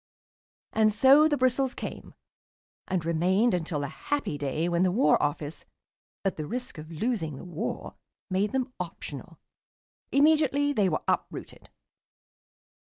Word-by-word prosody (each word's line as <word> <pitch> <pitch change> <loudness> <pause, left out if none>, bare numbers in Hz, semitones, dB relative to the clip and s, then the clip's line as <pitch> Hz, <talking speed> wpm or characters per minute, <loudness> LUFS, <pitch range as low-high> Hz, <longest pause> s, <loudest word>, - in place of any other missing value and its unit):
And 215 -1 +4
so 270 +8 +6
the 295 -2 +1
bristles 255 0 +1
came, - - -7 0.7
and 185 -3 -1
remained 185 +8 +2
until 160 -4 -1
the 140 - -2
happy 280 - -3
day 145 +3 -1
when 170 0 +1
the 185 - +4
War 240 +9 +3
Office, 145 +1 -2 0.6
at 195 - 0
the 155 -1 -4
risk 245 -7 -5
of 155 +1 -9
losing 165 - -2
the 135 - -9
war, 180 +5 -4 0.3
made 195 +2 0
them 260 -1 -2
optional. 165 -3 -7 0.7
Immediately 290 -1 +3
they 200 -7 +2
were 155 - -2
uprooted. - - -3
190 Hz, 135 wpm, -28 LUFS, 160-255 Hz, 0.7 s, so